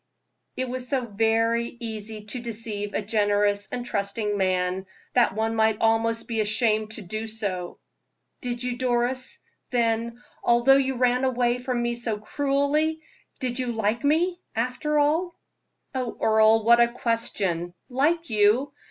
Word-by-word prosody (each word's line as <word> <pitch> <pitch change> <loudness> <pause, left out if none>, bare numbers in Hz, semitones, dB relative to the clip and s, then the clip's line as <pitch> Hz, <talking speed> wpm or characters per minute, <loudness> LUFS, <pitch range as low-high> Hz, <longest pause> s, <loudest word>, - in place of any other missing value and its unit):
It 260 - 0
is 250 0 -3
so 265 -3 0
very 225 +2 +1
easy 220 -2 -6
to 230 +4 -4
deceive 215 -3 -4
a 215 - -1
generous 205 -1 +1
and 245 -1 -4
trusting 205 -1 -2
man, 185 -1 0 0.3
that 240 -5 +3
one 225 +1 0
might 220 -1 +3
almost 225 0 +1
be 230 -2 -2
ashamed 215 0 +1
to 215 - -5
do 215 +5 -4
it. 185 -5 -3 0.6
"Did 245 0 -3
you, 250 -1 -2
Doris? 255 0 -1 0.3
Then, 235 0 0 0.2
although 240 +3 +5
you 265 -1 0
ran 250 +1 +2
away 245 -1 +1
from 250 -1 -2
me 240 0 0
so 235 -2 -2
cruelly, 285 +7 0 0.4
you 255 - +1
did 250 - -2 0.2
like 220 +3 0
me, 345 +5 +1
after 250 +6 -1
all?" 320 +5 +1 0.5
"Oh, 255 -3 -3
Earle, 220 0 +4
what 235 +2 +6
a 235 - +6
question! 200 -8 -1
Like 300 +4 0
you? 215 +6 +3
230 Hz, 145 wpm, -25 LUFS, 215-250 Hz, 0.6 s, what